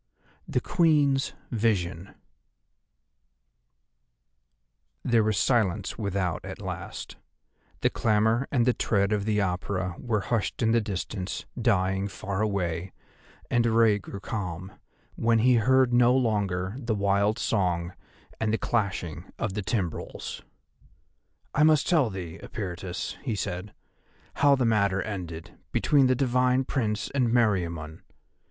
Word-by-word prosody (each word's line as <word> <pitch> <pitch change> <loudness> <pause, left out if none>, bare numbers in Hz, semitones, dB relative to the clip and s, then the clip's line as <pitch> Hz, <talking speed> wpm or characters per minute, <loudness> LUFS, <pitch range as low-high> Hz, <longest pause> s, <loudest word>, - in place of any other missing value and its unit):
THE - - 0
QUEEN'S 145 -5 +2 0.2
VISION 100 -6 -1 2.9
There 115 -2 +3
was 105 -2 +1
silence 105 -5 +1
without 100 -5 -1
at - - -7
last; - - -6 0.6
the - - +2
clamour 110 +3 +2
and 120 -4 +2
the 125 - +4
tread 100 -3 +1
of 100 -1 -1
the 110 -1 +1
Apura 90 -1 -1
were 110 -5 -1
hushed 115 +3 -1
in 115 - +3
the 115 0 +3
distance, 100 -2 -4 0.2
dying 95 -3 +1
far 100 0 -4
away, 95 -4 -1 0.6
and 120 -1 +3
Rei 115 -2 +4
grew 100 0 -8
calm, 95 -3 -5 0.4
when 115 0 +2
he 120 +2 +4
heard 130 +2 +3
no 120 +1 +5
longer 100 -6 0
the 115 -4 -1
wild 100 +2 +2
song, 90 -7 0 0.5
and 110 -1 0
the 110 - +2
clashing 95 -10 -2
of - - -2
the 105 - -2
timbrels. 95 -3 -3 1.1
"I 150 - +1
must 155 -2 +5
tell 155 -9 +3
thee, 90 -5 -7
Eperitus," 90 -2 -5
he 120 -6 -2
said, 95 0 -4 0.7
"how 140 0 +5
the 130 -2 0
matter 100 -4 +2
ended 85 -6 -7
between 140 -3 +3
the 130 - +3
divine 125 0 +2
Prince 110 -5 -2
and 130 -3 +1
Meriamun. 85 -9 0
105 Hz, 125 wpm, -27 LUFS, 95-120 Hz, 2.9 s, no